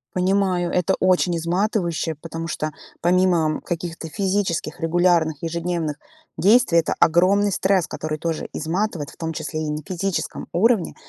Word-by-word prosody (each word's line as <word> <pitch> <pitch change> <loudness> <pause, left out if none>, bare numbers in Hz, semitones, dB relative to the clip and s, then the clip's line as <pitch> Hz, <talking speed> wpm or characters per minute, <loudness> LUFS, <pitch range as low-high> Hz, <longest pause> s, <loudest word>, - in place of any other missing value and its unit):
Понимаю, 185 -1 +1
это 180 +1 +2
очень 180 -2 +3
изматывающе, 170 -1 -1
потому 165 +2 -6
что, 155 -1 -3 0.3
помимо 175 -3 +2
каких-то 170 -1 -5
физических 185 -4 -1
регулярных, 165 -2 +2
ежедневных 165 -2 -2 0.4
действий, 210 -4 +5
это 165 - +1
огромный 190 +5 +4
стресс, 190 -2 +1
который 155 0 -4
тоже 165 -1 -3
изматывает. 165 -1 -2
В - - -17
том 165 -1 -3
числе 155 0 -4
и - - -2
на 150 - -2
физическом 190 0 -3
уровне. 210 +1 +2
175 Hz, 135 wpm, -22 LUFS, 160-185 Hz, 0.4 s, действий